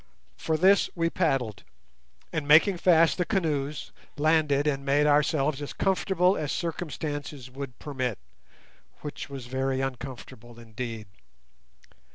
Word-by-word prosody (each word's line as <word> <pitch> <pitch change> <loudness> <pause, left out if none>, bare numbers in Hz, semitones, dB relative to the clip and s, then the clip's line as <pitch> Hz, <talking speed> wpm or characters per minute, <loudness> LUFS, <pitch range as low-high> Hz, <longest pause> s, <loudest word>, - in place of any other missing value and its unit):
For 160 -1 -1
this 190 +4 +4
we 165 -1 0
paddled, 135 - 0 0.7
and, 155 -3 -2
making 165 +6 +6
fast 170 -1 +4
the - - +3
canoes, 150 -7 -2 0.3
landed 150 -2 +2
and 140 -2 0
made 140 +2 +2
ourselves 150 -1 +2
as 145 - -5
comfortable 190 -1 +2
as 150 -2 -2
circumstances 145 -5 -4
would 135 -2 -7
permit, 130 -7 -3 0.8
which 145 -1 -7
was 135 -3 -7
very 130 +1 -1
uncomfortable 125 -3 -6
indeed. 115 -1 -6
145 Hz, 120 wpm, -27 LUFS, 130-160 Hz, 0.8 s, making